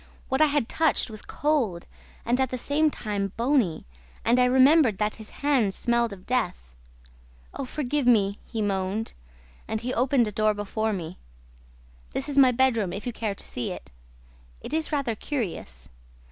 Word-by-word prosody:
What 265 +3 +1
I 310 - +7
had 285 -5 0
touched 315 -7 +1
was 215 - -7
cold 255 - -1 0.4
and, 245 +2 +2
at 260 - +1
the 255 - -3
same 295 +5 +2
time, 205 -7 -3
bony; 235 - +1 0.4
and 240 +2 +4
I 250 - +5
remembered 260 -2 +5
that 210 +1 -1
his 220 -1 -10
hands 260 -9 +1
smelt 235 -1 +1
of 190 -2 -10
death. 180 - -2 0.8
'Oh, 275 - -4
forgive 285 0 -2
me!' 205 -5 +4
he 225 -2 -4
moaned. 195 +2 -2 0.5
And 220 0 -3
he 250 +2 -3
opened 250 -1 +2
a - - -3
door 215 +1 +1
before 215 +2 -2
me. 180 -3 -5 0.9
'This 275 - -2
is 280 - -3
my 260 -2 +7
bedroom, 230 -6 +2
if 200 - -6
you 245 - -3
care 215 -3 -3
to - - -7
see 120 - -3
it. - - -9 0.7
It - - -8
is 320 0 0
rather 280 -6 0
curious.' 195 - -5
235 Hz, 175 wpm, -26 LUFS, 205-265 Hz, 0.9 s, I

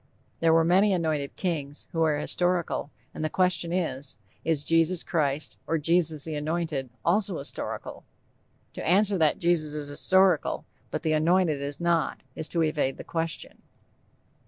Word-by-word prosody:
_ - - -38 0.4
There 165 -1 +4
were 165 0 +5
many 190 +4 +4
anointed 155 -5 -1
kings, 150 -6 -3
who 165 -3 -1
are 155 -2 +3
historical, 175 0 0 0.2
and - - -5
the 155 - 0
question 180 -2 +1
is, 145 - -2 0.3
Is 155 -3 0
Jesus 165 +2 +2
Christ 150 -3 -1
or 165 - +1
Jesus 160 -1 +1
the 160 - -4
Anointed 150 -3 -2 0.2
also 190 0 +2
historical? 140 - -5 0.7
To - - -6
answer 195 +2 +3
that 155 -2 +3
Jesus 165 -3 +1
is 145 -1 -5
historical, 190 +5 +2 0.2
but - - -4
The 155 - +1
Anointed 160 -1 +2
is 140 0 -4
not, 170 -2 0
is 160 - -3
to 165 -2 +1
evade 150 -4 0
the - - -7
question. 165 -1 -2
165 Hz, 160 wpm, -27 LUFS, 150-175 Hz, 0.7 s, were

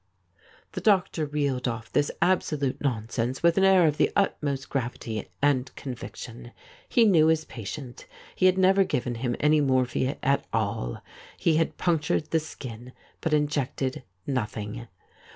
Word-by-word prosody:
The - - -5
doctor 185 -6 +2
reeled 140 -3 -1
off 115 -1 -4
this 145 - +2
absolute 150 -6 0
nonsense 120 0 -2
with 170 -1 +5
an - - +3
air 190 -2 +6
of 150 -1 +2
the - - +3
utmost 140 -8 0
gravity 120 -4 -4
and 135 -3 +2
conviction. 120 -2 -8 0.4
He 235 - +5
knew 165 -7 +5
his 160 -1 +2
patient. 120 +3 -8 0.3
He 185 - +4
had 185 0 +3
never 190 +1 +5
given 125 -9 -2
him 120 -2 0
any 150 0 +4
morphia 130 0 +1
at 140 +1 +2
all 100 - -2 0.2
— - - -20
he 160 -2 +2
had 165 - 0
punctured 155 -2 0
the 160 - +3
skin, 125 -5 -9 0.3
but 160 - -1
injected 145 -3 0 0.2
nothing. 115 -3 -3
140 Hz, 150 wpm, -26 LUFS, 120-160 Hz, 0.4 s, air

